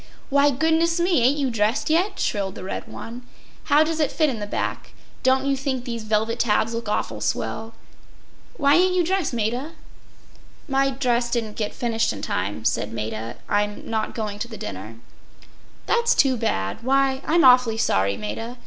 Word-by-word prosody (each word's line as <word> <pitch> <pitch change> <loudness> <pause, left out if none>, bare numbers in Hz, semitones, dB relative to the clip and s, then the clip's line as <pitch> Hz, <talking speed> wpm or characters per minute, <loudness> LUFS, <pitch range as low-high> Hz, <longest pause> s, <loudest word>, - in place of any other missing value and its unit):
“Why, 280 +1 +5
goodness 320 +4 +2
me! 345 -5 +3
ain’t 260 +5 +3
you 275 -3 0
dressed 220 +2 0
yet?” 360 +6 +1
shrilled 195 -4 -1
the - - -8
red 190 - -5
one. 235 +2 -8 0.4
“How 295 +2 +5
does 320 0 -2
it 300 - +1
fit 310 -3 +2
in 230 - -5
the 205 - -4
back? - - -4 0.3
Don’t 265 +1 +3
you 275 0 +2
think 265 -2 -3
these 235 -3 -5
velvet 220 +2 0
tabs 225 0 +2
look 230 -2 -4
awful - - -2
swell? 225 +1 -3 0.8
Why 285 -1 +4
ain’t 365 +3 +4
you 360 - +3
dressed, 370 -2 0
Maida?” 240 +7 -2 0.9
“My 275 -1 +2
dress 245 -3 0
didn’t 225 -3 -2
get 210 -2 -3
finished 230 -3 0
in 100 - -7
time,” 105 +2 -3
said 105 - 0
Maida. 110 +1 -4
“I’m 205 0 -1
not 220 -1 -2
going 210 -2 -4
to 235 - -3
the 225 -2 -9
dinner.” 100 - -7 0.9
“That’s 470 0 +2
too 270 -2 +4
bad. 155 - -2
Why, 270 +1 +2
I’m 335 0 +4
awfully 250 -3 +6
sorry, 100 - +1
Maida. 225 - -5
240 Hz, 175 wpm, -23 LUFS, 215-280 Hz, 0.9 s, awfully